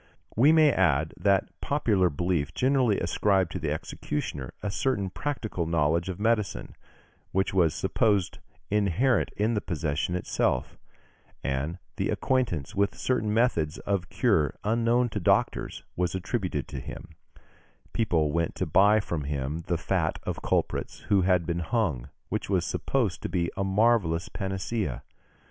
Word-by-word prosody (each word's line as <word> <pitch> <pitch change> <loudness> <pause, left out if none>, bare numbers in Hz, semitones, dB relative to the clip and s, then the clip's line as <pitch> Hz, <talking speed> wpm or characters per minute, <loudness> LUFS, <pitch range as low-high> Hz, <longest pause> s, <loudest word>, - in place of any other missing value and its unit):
We 135 +7 +6
may 155 -2 +6
add 80 - +2
that 100 -1 +2
popular 105 -11 +2
belief 85 0 -1
generally 130 -5 +2
ascribed 95 0 +1
to - - -4
the 75 -1 -2
executioner 75 -3 -4
a 100 - -1
certain 100 -5 -1
practical 110 - -3
knowledge 85 +2 +1
of 95 0 -5
medicine, 105 -2 0 0.6
which 95 +1 0
was 85 -5 +3
supposed 100 -5 +1 0.3
inherent 105 +4 +2
in 110 +3 +1
the 105 - 0
profession 80 -1 -2
itself; 75 -7 -1 0.7
and 70 +6 -2 0.2
the - - 0
acquaintance 120 - 0
with 100 0 +1
certain 115 -5 0
methods 105 -10 +1
of 100 -4 -2
cure 75 -4 +2
unknown 115 +3 +2
to 105 - -3
doctors, 85 - +1
was 90 0 -1
attributed 95 - -2
to - - -5
him; - - -8 0.8
people 80 -9 +1
went 85 +1 -1
to 95 - -1
buy 100 +6 +5
from 85 -8 -3
him 70 +2 -2
the 85 - +1
fat 85 -2 0
of - - -4
culprits - - -1
who 100 -2 +4
had 90 -2 +2
been 85 +1 -1
hung, 85 - -1 0.2
which - - -3
was - - +1
supposed 115 -10 -1
to - - -3
be 85 -2 -1
a 100 - -1
marvellous 95 -4 +2
panacea. 95 - -3
95 Hz, 145 wpm, -27 LUFS, 80-110 Hz, 0.8 s, We